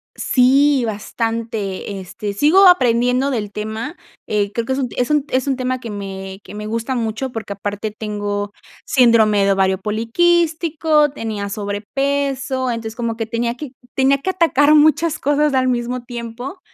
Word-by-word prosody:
Sí, 270 +1 +3
bastante, 220 -2 -3
este, 200 +2 -6
sigo 315 - +5
aprendiendo 250 -4 +3
del 210 -6 -3
tema, 220 - -5 0.3
eh, 205 -1 0
creo 230 +1 -2
que 265 - -1
es 270 - -2
un 250 -3 -1
es 250 +3 0
un 295 -2 +2
es 260 +1 0
un 270 -2 0
tema 255 0 -2
que 230 -3 -7
me 195 -1 -6
que - - -11
me 210 0 -6
gusta 230 +4 -2
mucho, 230 +3 -2
porque 220 -3 -5
aparte 205 +2 -4
tengo 205 -1 -4 0.3
síndrome 220 -6 +4
de 200 - +3
ovario 190 -1 +2
poliquístico, 310 - +1
tenía 215 -6 -4
sobrepeso, 260 +6 -2
entonces 225 -1 -5
como 235 -2 -2
que 225 -1 -4
tenía 235 +1 -1
que 275 0 -8 0.2
tenía 270 +1 +3
que 375 +7 -2
atacar 305 -5 +3
muchas 310 +1 +4
cosas 290 +1 +1
al 260 -1 +2
mismo 245 0 -1
tiempo 245 - -7
235 Hz, 160 wpm, -19 LUFS, 210-275 Hz, 0.3 s, sigo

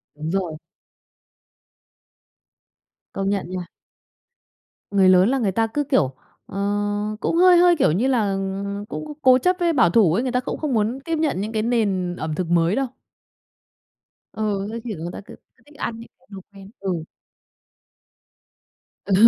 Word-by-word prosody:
Đúng 155 +2 -4
rồi. 180 -5 -2 2.6
Công 195 0 -1
nhận 195 -3 -2
nha. 185 -1 -4 1.3
Người 195 -2 +5
lớn 185 +3 +5
là 270 - +1
người 210 -6 +1
ta 225 +4 +1
cứ 290 +6 -1
kiểu 260 - +1 0.3
ờ, 195 - -9 0.6
cũng 330 - -1
hơi 360 0 +7
hơi, 350 0 +6
kiểu 280 - +3
như 215 +11 +1
là, 225 -7 +1
ừm, 195 +1 -3
cũng 300 +6 -6
cố 255 -1 +6
chấp 365 +8 +2
với 340 -1 +2
bảo 210 - +4
thủ 180 -3 +4
ấy, 230 +8 +1
người 255 - -1
ta 250 - +1
cũng 255 - -4
không 300 -4 -2
muốn 225 +4 0
tiếp 330 - -1
nhận 305 -11 0
những 215 +2 -3
cái 220 -1 -1
nền 200 -7 0
ẩm 155 -2 -4
thực 180 -1 -2
mới 170 +2 +3
đâu. 270 0 0 1.5
Ừ, 205 -2 -2
thế 230 - -4
thì 220 -5 -4
người 165 +2 -5
ta - - -7
cứ - - -11 0.2
cứ - - -29
thích 290 0 -19
ăn 225 -3 -4
những 230 - -12
cái - - -30
đồ 195 - -8
quen. 195 0 -13
Ừ. 185 -5 -2 2.0
Ừ, 200 - 0
205 Hz, 175 wpm, -22 LUFS, 185-255 Hz, 2.6 s, hơi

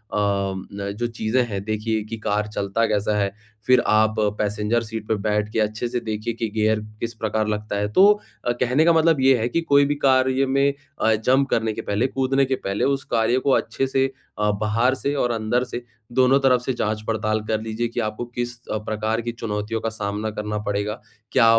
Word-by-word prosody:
न 100 -1 -1
जो 120 - 0
चीज़ें 115 +2 0
हैं 100 -3 -4
देखिए 110 0 -1
कि 115 - -4
कार 105 0 -1
चलता 105 +2 -1
कैसा 105 0 0
है? 100 -1 +1 0.4
फिर 130 -1 +6
आप 110 0 +3 0.2
पैसेंजर 105 +3 0
सीट 110 -1 -6
पर 110 - +1
बैठ 105 -1 0
के - - +1
अच्छे 110 +2 0
से 125 +1 -2
देखिए 110 +1 -3
कि 115 0 -2
गियर 110 0 +2 0.2
किस 115 0 -3
प्रकार 110 -1 -1
लगता 105 -1 -2
है 105 0 0
तो 190 - +7 0.4
अ, 120 - +2
कहने 125 +5 +2
का 170 - +6
मतलब 160 -3 +3
ये 130 -1 +5
है 115 - 0
कि 170 - 0
कोई 140 -3 +4
भी 145 +1 0
कार्य 130 0 +3
में 140 +1 +2 0.3
अ, 110 - +4
जंप 130 +5 +2
करने 110 -1 +1
के - - -5
पहले, 105 +5 0
कूदने 135 +1 +1
के 130 0 0
पहले 100 -4 -3
उस 140 0 0
कार्य 115 +3 +3
को 140 +1 +1
अच्छे 135 - -1
से 135 0 +2 0.3
अ, 105 0 +2
बाहर 115 +5 +2
से 140 +2 -2
और 125 -3 +1
अंदर 115 +2 0
से 120 - -4 0.3
दोनों 130 +2 +4
तरफ 130 -2 +4
से 130 +1 -2
जाँच-पड़ताल 110 -1 -1
कर 110 -1 0
लीजिए 110 +2 -2
कि - - -4
आपको 110 +2 -3
किस 120 0 -5
अ, - - 0
प्रकार 110 +1 -2
की 120 +1 -3
चुनौतियों 110 -1 -3
का 115 - -1
सामना 105 -1 -3
करना 105 0 -3
पड़ेगा? 105 +2 -2 0.3
क्या 125 - +5
110 Hz, 210 wpm, -23 LUFS, 105-125 Hz, 0.4 s, तो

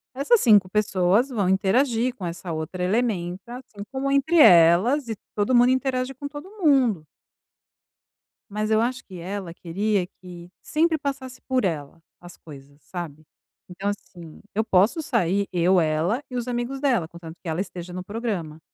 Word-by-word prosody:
essas 290 - +3
5 205 -6 +5
pessoas 200 +3 +2
vão 205 -8 0
interagir 230 +6 +2
com 225 - -10
essa 170 +1 -5
outra 160 +3 -4
elementa, 195 +1 -1
assim, 220 -5 -10
como 270 +1 -2
entre 280 +5 +2
elas 185 - +6
e 225 - -2 0.2
todo 210 +5 +1
mundo 245 +1 +6
interage 260 0 -1
com 285 +2 -7
todo 290 +4 -9 0.2
mundo. 250 - +3 1.5
Mas 215 +1 -2
eu 220 - +4
acho 250 +3 -2
que 185 -2 -11
ela 185 0 -5
queria 190 +2 -1
que 175 -1 -11
sempre 320 +1 +1
passasse 275 -3 -5
por 260 -3 0
ela 160 -2 -3 0.2
as 175 0 -13
coisas, 140 -1 -14
sabe? 155 -2 -7 0.4
Então 190 +2 -4
assim, 175 -5 -10
eu 220 +2 +1
posso 205 - +3
sair 200 - 0
eu, 180 +1 +3
ela 165 - 0
e 250 - -5
os 240 -1 -3
amigos 245 +2 -3
dela 245 - +1
contanto 170 -1 -11
que 175 - -7
ela 160 +2 -1
esteja 180 -2 -6
no 180 0 -6
programa. 200 -8 -4
205 Hz, 165 wpm, -24 LUFS, 175-255 Hz, 1.5 s, elas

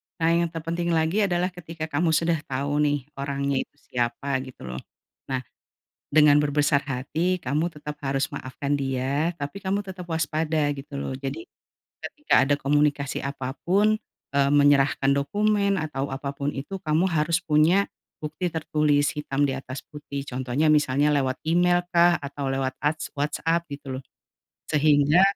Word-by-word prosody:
nah 165 0 +2
yang 170 0 +3
terpenting 165 +1 -2
lagi 165 +6 +2
adalah 180 0 0
ketika 165 -2 -7
kamu 160 +2 +2
sudah 165 0 +2
tau 140 +2 -1
nih 145 -2 +1 0.2
orangnya 140 0 -1
itu - - -6
siapa 125 +3 -2
gitu 130 - -12
loh. 65 0 -5 0.5
Nah, 130 -1 -2 0.7
dengan 150 -1 +6
berbesar 145 -1 +2
hati 155 +8 0
kamu 155 +1 -1
harus 165 - -18
tetap 150 0 -6 0.4
maafkan 140 +2 -4
dia, 135 +2 0
tapi 145 +6 -5
kamu 200 +1 -1
tetep 185 -2 -8
waspada 160 -2 0
gitu 140 0 -8
loh. 140 - -3
Jadi 140 - -4 0.6
ketika 295 - +1
ada 145 - +3
komunikasi 145 0 +1
apa 135 -2 -4 0.2
pun, 210 +4 +3 0.3
eee, 140 0 +3
menyerahkan 140 -1 +4
dokumen 200 +8 +2
atau 150 -5 -2
apapun 140 +1 -4
itu 170 +8 -5
kamu 175 +1 +1
harus 165 +2 +1
punya 160 +5 +4 0.4
bukti 155 +4 -2
tertulis 150 -3 +1
hitam 145 -2 -1
di 140 - +2
atas 135 0 -6
putih. 140 -2 -7
Contohnya 130 +3 0
misalnya 145 0 +3
lewat 135 -3 0
email 175 +2 +3
kah, 175 0 +5
atau 140 0 -4
lewat 135 0 0
as 150 +2 -1
WhatsApp 165 +3 0
gitu 140 -2 -6
loh. - - -14 0.6
Sehingga 150 +2 +4
150 Hz, 150 wpm, -25 LUFS, 140-170 Hz, 0.7 s, dengan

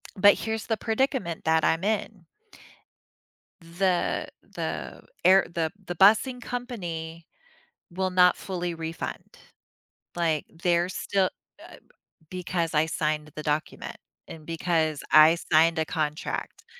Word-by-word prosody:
But 205 +1 +6
here's 220 -1 -3
the 225 - 0
predicament 225 - -1
that 160 0 +3
I'm 165 +3 +2
in. 205 -3 -2 1.4
The 175 +2 -1
the - - -6 0.2
air 190 +1 +6
the 160 -2 -1 0.2
the 175 - -4
busing 220 +7 +4
company 175 -11 -6 0.7
will 185 +2 -2
not 180 0 +5
fully 175 -2 -4
refund. 165 0 -6 0.8
Like, 160 -3 0 0.2
they're 175 0 +2
still, 190 0 0 0.3
uh - - -12 0.5
b 185 +2 -6
because 170 -2 -2
I 150 +1 +3
signed 155 -1 -2
the 155 - -6
document 150 0 -3 0.3
and 160 -1 -10
because 160 -2 0
I 155 +2 +8 0.2
signed 165 +1 +5
a 160 - +2
contract, 155 -1 -4
170 Hz, 120 wpm, -26 LUFS, 160-195 Hz, 1.4 s, I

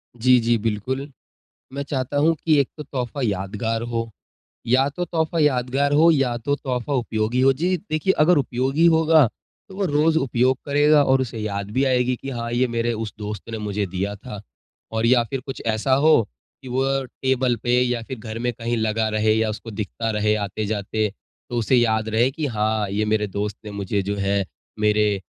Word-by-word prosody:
जी, 125 +2 +4
जी। 115 0 +2
बिल्कुल, 115 +6 -3 0.6
मैं 140 +1 -3
चाहता 135 -1 -3
हूँ 155 +3 +4
कि 155 -3 +4
एक 140 - +1
तो 150 - -6
तोहफ़ा 130 -2 -4
यादगार 105 +2 -2
हो 115 0 -2 0.6
या 130 +3 +4
तो 175 +5 -4
तोहफ़ा 165 -1 -1
यादगार 135 -1 +1
हो 160 +3 +6
या 135 -6 +1
तो 140 +5 -1
तोहफ़ा 130 -1 -3
उपयोगी 120 -1 0
हो। 135 +1 +5
जी, 175 +7 0 0.2
देखिए 155 +5 +2
अगर 165 +3 +5
उपयोगी 135 +4 +1
होगा, 160 -3 +5 0.4
तो 190 - -11
वो 200 0 -1
रोज़ 155 0 +2
उपयोग 130 -2 +2
करेगा 145 +1 +4
और 130 -1 +3
उसे 120 -3 -4
याद 100 -1 -4
भी 130 +5 +1
आएगी 125 -1 +2
कि 135 - -8
हाँ, 115 -2 -4
ये 125 +2 +2
मेरे 120 0 -1
उस 110 -1 -5
दोस्त 105 0 -6
ने 110 - -3
मुझे 105 -1 -2
दिया 95 +2 -3
था। 105 0 -9 0.5
और 110 0 0
या 120 0 +4
फ़िर 135 +3 -4
कुछ 135 - -6
ऐसा 110 +4 +1
हो 140 -5 +4 0.3
कि - - -11
वो 130 +2 0 0.4
टेबल 130 -2 +1
पे 125 0 +3
या 125 -1 0
फ़िर 130 0 -7
घर 110 0 -6
में 120 +1 0
कहीं 115 +1 -2
लगा 110 0 0
रहे 110 0 +2
या 110 0 +1
उसको 110 +2 -6
दिखता 110 +2 -4
रहे 105 0 +1
आते-जाते। 105 +1 -2 0.4
तो 120 - -3
उसे 120 +3 +2
याद 110 -2 +2
रहे 115 +3 +3
कि 155 +2 -3
हाँ, 110 -4 0
ये 105 +2 -1
मेरे 105 0 +1
दोस्त 100 +1 -4
ने 105 - -6
मुझे 100 0 -2
जो 100 +1 -3
है 100 0 0 0.4
मेरे 105 -1 +2
120 Hz, 195 wpm, -22 LUFS, 110-135 Hz, 0.6 s, हो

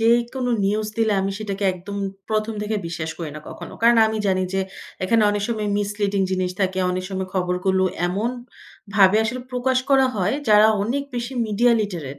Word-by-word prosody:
যেকোনো 240 +2 +2
নিউজ 210 +2 0
দিলে, 220 -2 +3
আমি 195 +1 -1
সেটাকে 200 -2 -4
একদম 185 +3 -8 0.3
১ম 215 +1 0
থেকে 215 +1 -1
বিশ্বাস 165 -1 -4
করি 160 -3 -4
না - - -7
কখনো। - - -9
কারণ 235 0 +6
আমি 220 0 -2
জানি, 185 -1 +2
যে 195 - +2 0.4
এখানে 225 +3 +3
অনেক 205 -1 -1
সময় 215 -3 -1
মিসলিডিং 205 -1 -1
জিনিস 185 -1 0
থাকে। 190 -1 0
অনেক 185 0 -2
সময় 190 -1 -3
খবরগুলো 185 +1 +1 0.2
এমন 210 +6 -1 0.6
ভাবে 195 0 +6
আসলে 245 +3 -2
প্রকাশ 255 +1 +1
করা 265 -1 +5
হয়। 200 +5 +1
যারা 210 0 +7 0.2
অনেক 255 +7 -1
বেশি 240 +2 -3
মিডিয়া 235 +3 +3
লিটারেট 165 -10 -4
205 Hz, 175 wpm, -22 LUFS, 185-230 Hz, 0.6 s, যারা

